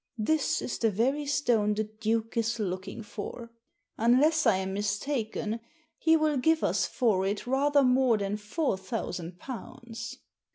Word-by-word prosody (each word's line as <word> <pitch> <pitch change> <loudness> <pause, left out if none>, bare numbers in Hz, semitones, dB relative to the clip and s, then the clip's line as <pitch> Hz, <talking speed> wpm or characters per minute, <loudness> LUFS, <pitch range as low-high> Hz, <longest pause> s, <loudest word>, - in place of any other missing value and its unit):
This 285 +7 +1
is - - -3
the 225 - +3
very 265 +8 0
stone 230 -7 +2
the 215 - 0
Duke 220 +1 -2
is 230 0 0
looking 190 +1 -4
for. 230 +2 -7 0.5
Unless 270 +6 +4
I 220 - +5
am 190 0 -3
mistaken, 215 +2 -2 0.4
he 325 0 +5
will 310 -2 +1
give 320 +5 +2
us - - +1
for 220 -8 +1
it 205 +1 -2
rather 280 +3 +3
more 250 -2 +4
than 200 0 -2
four 215 - -1
thousand 180 -4 -5
pounds." 235 +1 -8
230 Hz, 150 wpm, -29 LUFS, 210-265 Hz, 0.5 s, I